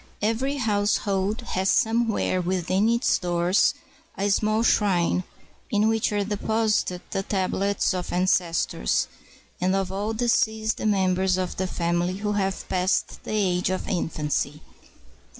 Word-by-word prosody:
] - - -35
Every 270 +5 -2
household 205 -2 0
has 190 +1 0
somewhere 225 -5 +1
within 185 +4 +1
its 235 +2 +2
doors 175 +2 +2 0.4
a 200 +1 +1
small 215 +2 +2
shrine, 185 -5 +2 0.5
in 210 +1 +2
which 225 -1 +1
are 205 -1 0
deposited 210 -2 0
the 195 - -1
tablets 195 0 0
of 180 -1 -4
ancestors, 175 - +1 0.5
and 185 +1 +2
of 195 -1 -1
all 205 +3 -2
deceased 220 -2 +1
members 190 -2 +1
of 185 -1 -2
the 190 - -1
family 175 +1 -1
who 210 +1 -2
have 195 -2 -2
passed 185 +1 0
the - - -7
age 185 -4 +1
of 185 - -3
infancy. 150 -4 -2
195 Hz, 130 wpm, -25 LUFS, 180-215 Hz, 0.5 s, its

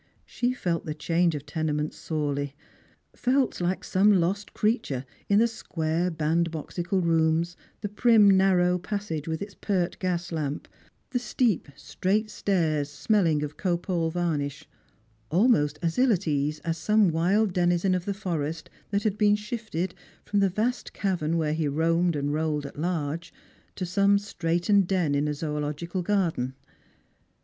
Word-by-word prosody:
She 245 0 -1
felt 175 -11 -2
the 155 - -3
change 170 +1 +1
of 145 -1 -6
tenement 150 0 -2
sorely, 145 -3 -3 0.6
felt 255 -4 +1
like 180 +2 -1
some 200 +3 +4
lost 195 +2 +1
creature 210 - 0 0.2
in 200 - +5
the 225 - +5
squara 170 -6 -1
bandboxical 165 +3 -1
rooms, 165 +1 +2 0.3
the 210 - -2
prim 215 +1 +5
narrow 180 -2 +3
passage 180 -5 -4
with 160 +3 -2
its 200 -1 -9
pert 185 -4 -1
gas 175 -2 -2
lamp, 150 -3 -3 0.4
the 245 - +1
steep 235 -5 0
straight 215 +3 -1
stairs 160 -9 0
smelling 160 0 +1
of 150 0 -6
copal 175 -2 0
varnish; 155 -4 -2 0.6
almost 165 - +3
as 165 +6 0
ill 255 -1 +5
at 190 -3 0
ease 150 0 0
as 165 0 -2
some 210 +4 +4
wild 185 +5 +2
denizen 175 +1 +2
of 180 -1 -1
the 200 - -2
forest 165 -5 -3 0.2
that 200 0 0
had 210 -2 -1
been 205 -1 +5
shifted, 210 -5 -4 0.3
from 205 - +1
the 195 -1 +3
vast 225 +7 -2
cavern 170 -5 -1
where 155 -2 0
he 155 -1 0
roamed 165 +3 +1
and 145 0 -1
rolled 150 -1 -1
at 140 - -8
large, 165 -1 -2 0.4
to 185 - -3
some 200 +3 +3
straitened 180 0 +1
den 180 -6 +1
in 145 +1 +1
a 150 - 0
zoological 150 +4 -3
garden. 170 -10 0
175 Hz, 150 wpm, -27 LUFS, 155-200 Hz, 0.6 s, in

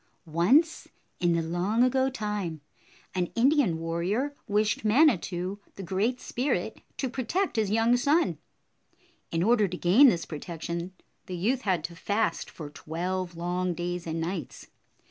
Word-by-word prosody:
Once 190 - +3 0.3
in 175 -2 +2
the 165 -1 +1
long 180 +8 +1
ago 260 +1 +3
time, 210 -9 -3 0.5
an 180 -1 0
Indian 250 - +3
warrior 175 - -1
wished 210 +1 +1
Manitou, 205 - +2 0.2
the 195 - -7
Great 205 +8 0
Spirit, 255 +4 -2 0.2
to 265 - -1
protect 270 - -1
his 215 -3 +1
young 225 +3 +3
son. 290 +7 +2 0.9
In 165 0 0
order 215 -1 +4
to 180 0 -5
gain 205 +13 +6
this 170 -6 -1
protection, 170 +2 -5 0.3
the 185 - -4
youth 240 +9 +1
had 185 -7 0
to 170 +1 -6
fast 205 0 -1
for 150 -3 -9
twelve 175 +3 -4
long 180 +1 -1
days 175 0 -4
and 165 0 -2
nights. 165 -3 -5
185 Hz, 145 wpm, -28 LUFS, 170-240 Hz, 0.9 s, gain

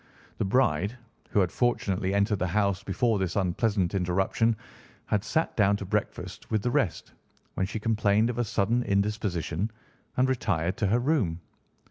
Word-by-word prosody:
The - - +1
bride, 100 - +1 0.3
who 105 - +3
had 90 -2 +1
fortunately 95 -6 0
entered 100 0 +2
the 90 - 0
house 100 +1 +1
before 110 +2 +1
this 95 -2 -1
unpleasant 95 0 +1
interruption, 95 +5 +1 0.5
had 105 -1 0
sat 160 +8 0
down 100 -2 +4
to 100 - -6
breakfast 105 +2 -3
with 110 -2 0
the 120 - 0
rest, 100 -7 0 0.4
when 95 - -1
she 110 +2 -4
complained 110 +1 +2
of 120 - -5
a - - +3
sudden 115 +2 +1
indisposition 100 -3 -1 0.5
and 130 +1 +4
retired 95 -9 0
to 105 - +1
her 110 +5 +3
room. 120 - +1
100 Hz, 160 wpm, -27 LUFS, 95-115 Hz, 0.5 s, down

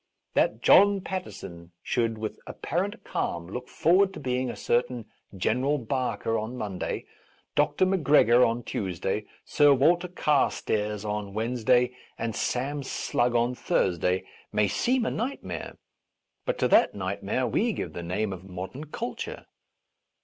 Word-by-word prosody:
That - - +1
John 200 -1 +6
Paterson 85 - -7
should, 115 -2 0
with 110 0 -5
apparent - - -3
calm, 85 0 -2
look 125 +8 -7
forward 190 +3 +3
to - - -6
being 125 0 -1
a - - -5
cer 120 - +2
tain 125 -3 -8 0.3
General 125 +10 +1
Barker 125 -2 -1
on 110 +4 -5
Monday, 100 -6 -3 0.5
Dr. 185 - +2
Mac 185 -1 +1
gregor 125 -5 +6
on 115 +1 +1
Tuesday, 95 +1 -2 0.2
Sir 145 -2 +5
Walter 170 +7 +3
Carstairs 110 - 0
on 105 -1 -3
Wednesday, 125 +2 +2 0.2
and 115 -2 -3
Sam 140 +4 -1
Slugg 120 -2 0
on 120 +1 +2
Thurs 90 -7 0
day, 90 +2 +1 0.3
may 105 -1 +2
seem 245 - +1
a - - 0
nightmare; 250 +5 -4 0.7
but - - 0
to - - +2
that - - +5
nightmare - - -2
we 235 - +1
give - - -4
the 85 - -5
name 95 +4 -2
of 95 -1 -9
modern 95 - -6
culture. 230 +11 -5
120 Hz, 145 wpm, -27 LUFS, 105-145 Hz, 0.7 s, John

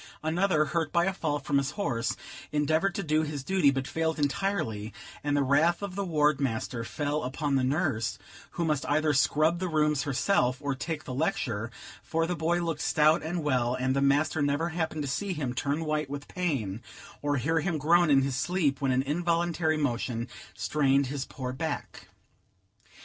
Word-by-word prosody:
Another, 160 0 +2
hurt 160 0 -1
by 170 0 +3
a 195 - 0
fall 155 -6 -1
from 140 0 +1
his 135 0 -1
horse, 120 - -1 0.3
endeavored 155 +5 +1
to 200 - -2
do 155 -1 +2
his 150 -3 -4
duty, 190 -3 +3
but 135 -1 -1
failed 160 0 -1
entirely, 140 - -1 0.3
and 145 0 +1
the 140 - +3
wrath 160 +8 +3
of 200 -2 -4
the 200 +1 -2
ward 150 -5 +2
master 115 -2 -2
fell 145 +5 -2
upon 140 +3 -2
the 135 -1 +3
nurse, 135 -4 0 0.4
who 170 - -1
must 150 -3 0
either 155 +1 +2
scrub 155 +4 +3
the 185 - -1
rooms 150 -3 +2
herself, 135 -2 +1
or 145 -1 -1
take 150 +3 -4
the 130 - -6
lecture; 125 - -1 0.3
for 165 0 0
the 180 +1 -2
boy 170 +2 0
looked 165 -3 -2
stout 155 +1 +4
and 165 +1 -3
well, 125 -4 +1
and 130 +1 0
the 140 - +1
master 145 +2 +2
never 145 +4 +1
happened 160 -2 -2
to - - -3
see 190 +8 -2
him 140 -7 -3
turn 145 +5 -1
white 155 -2 -1
with 145 0 -6
pain, 130 - -2 0.4
or 145 -1 0
hear 160 +6 +1
him 170 0 -1
groan 170 +3 +4
in 135 -2 +5
his 135 -1 -1
sleep 145 -3 0
when 135 -2 +2
an 130 +1 +2
involuntary 170 +1 0
motion 120 -4 -1 0.3
strained 140 -2 +2
his 140 -1 -3
poor 130 -2 -5
back. 160 +2 -5
150 Hz, 190 wpm, -28 LUFS, 135-165 Hz, 0.4 s, in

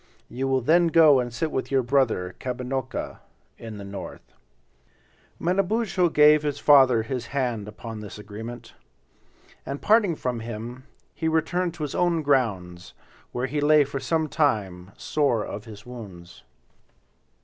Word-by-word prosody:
You 135 +2 -3
will 130 -1 +1
then 170 +7 +4
go 160 -4 +6
and 120 -1 -2
sit 150 +7 -2
with 130 - -3
your 135 -2 +2
brother, 120 -8 +1
Kabinocca, 130 +1 -4 0.4
in 110 -2 -8
the 100 - -8
north." 100 -1 -9 1.1
Manabozho 190 +1 +1
gave 150 -1 +6
his 145 -1 -2
father 130 -6 +5
his 120 0 -4
hand 120 -6 -2
upon 110 +1 -8
this 105 -1 -9
agreement. 110 +3 -9 0.9
And 140 +1 -5
parting 205 -5 +3
from. 125 -4 -3
him, 120 +3 -7 0.3
he 160 - -3
returned 170 +2 0
to 160 - -5
his 145 - -4
own 170 -3 +1
grounds, 95 -11 -1 0.4
where 125 +1 -2
he 145 +3 -2
lay 150 0 +5
for 140 0 -5
some 155 +4 0
time 100 - -1
sore 140 -8 0
of 105 +2 -7
his 110 -1 -12
wounds. 95 -8 -11
130 Hz, 145 wpm, -25 LUFS, 110-150 Hz, 1.1 s, go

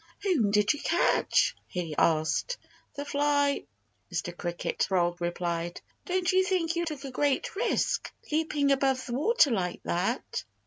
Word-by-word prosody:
"Whom 320 - +2
did 210 +3 +3
you 295 - -7
catch?" 340 - +2
he 175 -4 -4
asked. 160 - +1 0.4
"The 285 - -4
fly!" 285 0 +1 0.5
Mr. 175 - -3
Cricket 175 -1 -3
Frog 175 -2 +1
replied. 175 0 -2 0.3
"Don't 370 0 +1
you 375 0 +4
think 360 -3 0
you 340 0 0
took 300 -4 -5
a 270 - -6
great 280 +5 0
risk, 475 +5 0 0.2
leaping 300 -2 +1
above 270 -1 +2
the 240 - -5
water 310 - +4
like 180 -5 -1
that?" 195 +9 -1
275 Hz, 145 wpm, -28 LUFS, -, 0.5 s, you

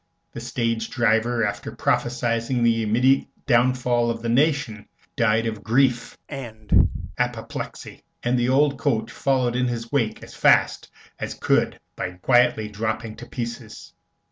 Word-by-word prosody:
The - - -7
stage 115 -1 -2
driver, 115 0 +1
after 100 - -4
prophesying 120 0 0
the 115 -1 +3
immediate 125 +5 +2 0.2
downfall 120 -1 +2
of 115 0 -3
the 115 - -1
nation, 135 -4 +1 0.3
died 115 0 +2
of 110 -2 -3
grief 125 0 +1
and 110 -6 0 0.3
apoplexy, - - -4 0.2
and 120 +1 +1
the 120 +1 +1
old 140 +1 +3
coach 115 -6 0
followed 130 -3 0
in 125 0 +1
his 115 -1 -4
wake 115 -6 -1
as - - -12
fast - - +3 0.3
as - - -4
could - - +1 0.2
by 90 - -4
quietly 120 +2 +2
dropping 110 +1 -3
to 120 - -10
pieces. 120 -2 -7
120 Hz, 140 wpm, -23 LUFS, 115-125 Hz, 0.3 s, the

